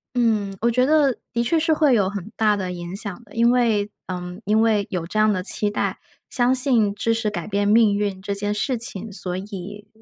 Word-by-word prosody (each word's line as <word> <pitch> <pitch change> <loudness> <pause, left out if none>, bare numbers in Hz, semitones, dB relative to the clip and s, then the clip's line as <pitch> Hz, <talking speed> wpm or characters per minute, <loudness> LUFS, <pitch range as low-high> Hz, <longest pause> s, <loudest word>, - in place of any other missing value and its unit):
嗯， 210 -5 0
我 235 +1 +2
觉 250 +2 +2
得 290 -4 +3 0.2
的 235 0 +1
确 320 +7 +1
是 320 0 +1
会 300 -4 +3
有 200 -4 +2
很 205 0 -7
大 215 -1 +2
的 185 -2 -3
影 175 +1 -6
响 205 +2 -4
的， 210 - -18
因 235 +1 +4
为 220 -4 +1 0.2
嗯， 180 +2 -6
因 215 +2 +3
为 215 -3 +2
有 175 -3 -3
这 215 +5 -3
样 215 0 +4
的 185 -2 -2
期 210 +1 +1
待， 205 - -2 0.3
相 250 0 +2
信 240 -6 +3
知 230 +2 0
识 225 -2 -1
改 210 - -5
变 205 0 0
命 215 -1 +4
运 200 -2 -2
这 200 +1 -3
件 205 +1 -1
事 250 +5 -1
情， 220 -2 -3
所 185 -2 -4
以 200 +1 -8
210 Hz, 240 characters per minute, -22 LUFS, 200-235 Hz, 0.3 s, 因